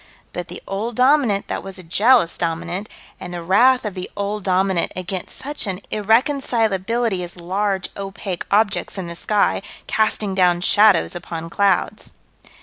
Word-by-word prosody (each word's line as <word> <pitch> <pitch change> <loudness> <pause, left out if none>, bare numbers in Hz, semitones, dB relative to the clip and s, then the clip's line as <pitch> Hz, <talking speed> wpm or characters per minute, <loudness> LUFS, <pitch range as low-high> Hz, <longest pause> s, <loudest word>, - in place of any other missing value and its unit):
But 175 0 -5
the - - -10
Old 215 +4 -3
Dominant 250 -6 +3
that - - -3
was 195 -1 -7
a 185 - -10
jealous 205 +2 +3
Dominant, 175 +4 -3 0.3
and 180 - -7
the 175 -1 -5
wrath 250 +8 +4
of 210 - -3
the 185 -1 -6
Old 205 0 -3
Dominant 190 -1 +1
against 185 0 -5
such 290 -4 -2
an 190 -1 -2
irreconcilability 225 -3 +1
as 175 0 -7
large, 190 +2 -1
opaque 195 -2 -5
objects 205 0 +1
in 190 - -4
the 170 0 -6
sky, 205 +3 +1 0.2
casting 215 -2 0
down 180 -2 +3
shadows 205 -1 +4
upon 165 -1 -6
clouds. 200 +2 0
195 Hz, 150 wpm, -21 LUFS, 180-215 Hz, 0.3 s, wrath